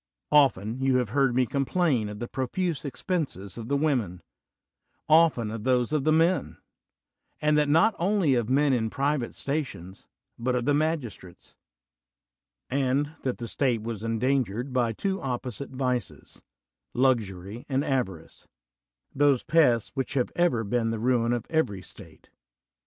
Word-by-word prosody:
Often 125 -6 +3
have 135 - 0
you 130 -2 +3
heard 130 +2 +1
me 130 0 +3
complain 135 - 0
of 105 - -7
the 120 - -5
profuse 155 +6 -2
expenses 140 - -3
of 115 -1 -7
the 140 - +1
women 120 - -1 0.4
— - - -49
often 155 -8 +4
of 110 -1 -6
those 125 +1 +1
of 150 -2 0
the 155 - +4
men; 165 +4 +2 0.8
and 150 0 +2
that 150 -1 +2
not 185 +9 +4
only 180 -5 +2
of 120 -2 0
men 140 +1 +3
in 110 -3 0
private 140 -1 -1
stations, 130 - -5 0.3
but 125 +2 0
of 125 -1 -1
the 145 - +3
magistrates; 145 - -3 1.1
and 140 +2 0
that 130 -2 -2
tiie 120 - -6
state 120 -4 0
was 115 -2 -5
endangered 120 +1 -1
by 120 -3 +1
two 195 - -2
opposite 125 0 -4
vices, 125 -4 -4 0.5
luxury 110 -4 0
and 135 +2 0
avarice 95 - -3 0.3
— - - -66 0.3
those 140 -2 +3
pests 125 -9 +3
which 135 -1 -3
have 125 -3 0
ever 170 -10 +2
been 115 +2 0
the 115 - -2
ruin 120 0 +1
of 120 -1 -1
every 105 - 0
state. 85 -5 -15
130 Hz, 150 wpm, -26 LUFS, 115-145 Hz, 1.1 s, often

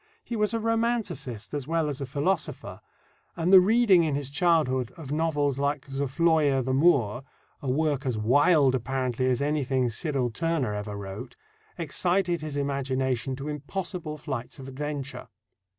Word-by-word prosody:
He 235 - -5
was 210 -1 +1
a 230 - -1
romanticist 225 - -2
as 145 -2 -3
well 165 -1 +1
as 145 -1 -4
a 135 - -3
philosopher, 145 - -2 0.5
and 170 +3 +1
the 190 - +12
reading 200 -2 +5
in 155 -3 0
his 140 -1 -3
childhood 140 -7 +2
of 150 -5 -8
novels 145 -3 0
like 140 0 -1
Zofloya 140 0 +2
the 130 +1 -1
Moor 130 -7 +3 0.4
a 135 - -3
work 145 0 0
as 120 -4 0
wild, 140 +5 +4
apparently, 130 0 -1
as 130 +1 +1
anything 135 -4 0
Cyril 130 0 -1
Tourneur 155 -4 -1
ever 105 0 -4
wrote 100 +5 -7 0.4
excited 175 +1 0
his 150 -2 -5
imagination 130 -2 -1
to 135 +2 -7
impossible 155 +2 -4
flights 135 -5 -5
of 135 -1 -9
adventure. 140 0 -5
140 Hz, 150 wpm, -27 LUFS, 130-165 Hz, 0.5 s, the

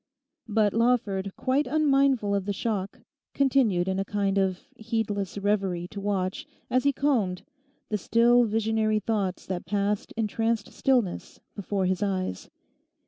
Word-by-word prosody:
But 215 -2 +2
Lawford, 225 -5 +1
quite 270 +3 +1
unmindful 275 -8 +2
of 200 -2 0
the 205 - -1
shock, 200 -1 -3 0.3
continued 250 -10 +2
in 190 0 0
a - - +1
kind 200 -1 0
of 190 -1 0
heedless 215 -4 -3
reverie 195 -4 0
to 200 - -7
watch, 190 -2 -2 0.2
as 255 +2 +2
he 285 - +5
combed, 235 -11 0 0.5
the 210 - -1
still 240 +4 +4
visionary 220 0 +1
thoughts 205 -4 -2
that 185 -2 -5
passed 205 0 -1
in 225 - +1
tranced 225 0 -1
stillness 245 -9 0 0.2
before 200 -1 -2
his 185 0 0
eyes. 185 - -2
205 Hz, 140 wpm, -27 LUFS, 195-230 Hz, 0.5 s, he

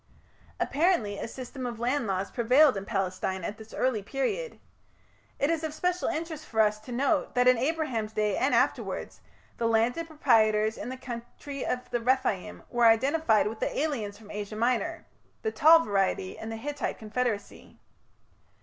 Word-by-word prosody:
Apparently 280 - +1
a - - -4
system 255 +2 -8
of 235 -2 -6
land 250 +1 0
laws 195 0 -2
prevailed 255 +4 +5
in 195 0 -4
Palestine 190 -2 -2
at 210 +5 -5
this 220 0 -12
early 255 -5 0
period. 400 - -3 0.8
It 285 +3 +1
is 325 -1 -1
of 310 -1 -3
special 360 +2 0
interest 320 -2 -4
for 220 -1 +2
us 210 0 +2
to 215 +3 -11
note 280 +5 0
that 250 0 +4
in 255 - +7
Abraham's 255 -5 -1
day 210 -2 +1
and 270 - +2
afterwards, - - -1 0.4
the 230 - 0
landed 235 +9 +1
proprietors 220 -8 +3
in - - -6
the 260 - -5
country 255 +3 -7
of 250 0 -2
the 240 -1 0
Rephaim 245 -5 0
were 240 -1 +4
identified 230 +1 +3
with 220 +1 -4
the - - -2
aliens 235 -10 -2
from 210 -1 -13
Asia 210 0 -5
Minor 250 +9 0 0.4
the 440 - 0
tall 325 -1 +7
variety 195 -6 0
in 220 - -7
the 225 - -5
Hittite 290 +5 -3
confederacy. 220 -1 -4
240 Hz, 165 wpm, -28 LUFS, 215-290 Hz, 0.8 s, in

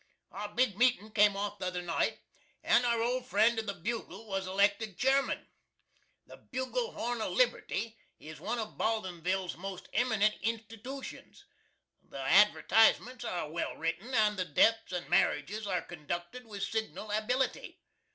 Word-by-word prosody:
Our 205 +1 -5
big 210 -2 +1
meetin' 240 -4 +3
came 210 -2 +4
off 205 0 -3
the - - -2
other 180 -1 -3
night, 170 -1 -1 0.4
and 245 - +4
our 235 -1 +2
old 250 +1 -1
friend 225 0 +3
of 220 - -5
the 200 - -2
"Bugle" 225 +4 -5
was 195 -2 -2
elected 200 +1 +1
Cheerman. 270 +1 +1 0.8
The - - -13
"Bugle 375 - -3
Horn 240 -1 -2
of - - -2
Liberty" 230 - 0 0.2
is 155 -1 -10
one 220 +9 -2
of 220 -2 -5
Baldinsville's 185 -4 -1
most 190 +1 -7
eminentest 220 -4 +2
institootions. 225 +4 -6 0.6
The - - -12
advertisements 220 - +4
are 175 -9 -3
well 170 - -3
written, 165 +9 -3
and 210 -1 +3
the 185 - 0
deaths 225 +8 +3
and 180 -1 -3
marriages 180 +5 +1
are 180 -2 -1
conducted 175 +9 -6
with 205 -2 -6
signal 220 -1 -3
ability. 245 +5 -1
215 Hz, 150 wpm, -31 LUFS, 185-235 Hz, 0.8 s, came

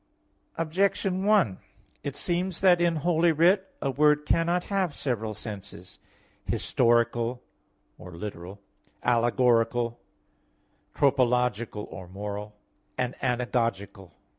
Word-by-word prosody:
Objection 185 +3 0
1: 200 - +3 0.4
It 140 -1 -5
seems 180 +1 -1
that 180 -2 +5
in 170 -1 +2
Holy 165 +2 +2
Writ 180 +5 +3 0.2
a 135 - 0
word 150 +2 +3
cannot 170 +3 +1
have 190 -6 -1
several 110 -5 -2
senses, 100 -4 -9 0.4
historical 120 0 +1 0.6
or 90 +1 -10
literal, 95 0 -7 0.4
allegorical, 120 0 +2 1.0
tropological 125 -5 +1
or 95 - -9
moral, 105 +2 -6 0.4
and 125 0 -1
anagogical. 115 -6 -2
125 Hz, 95 wpm, -27 LUFS, 105-165 Hz, 1.0 s, that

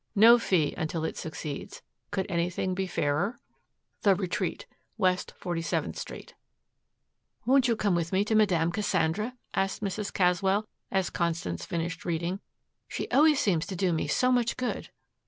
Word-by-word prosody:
No 230 +4 +8
fee 175 -9 +2
until 160 0 -2
it - - -3
succeeds. 150 -2 -6 0.3
Could 190 -2 -1
anything 175 +2 -1
be 190 +1 -2
fairer? 175 +8 0 0.6
THE 200 -2 +5
RETREAT, 185 - -2 0.3
W. 185 -1 +4
47th 175 -2 -3
Street. - - -8 1.1
"Won't 260 0 +4
you 235 - +2
come 205 -3 +1
with 170 -1 0
me 195 +2 +2
to 220 - 0
Madame 180 -6 +3
Cassandra?" 210 +3 0 0.2
asked 195 +2 -1
Mrs. 200 +1 -2
Caswell, 190 +3 +2 0.2
as 190 -2 0
Constance 165 - -2
finished 170 0 -3
reading. 175 +2 -2 0.5
"She - - -4
always 300 0 +5
seems 170 -6 +1
to 190 - -4
do 180 -1 +1
me 160 - -1
so 255 0 +2
much 245 -2 +1
good." 255 -1 -3
185 Hz, 150 wpm, -28 LUFS, 170-210 Hz, 1.1 s, No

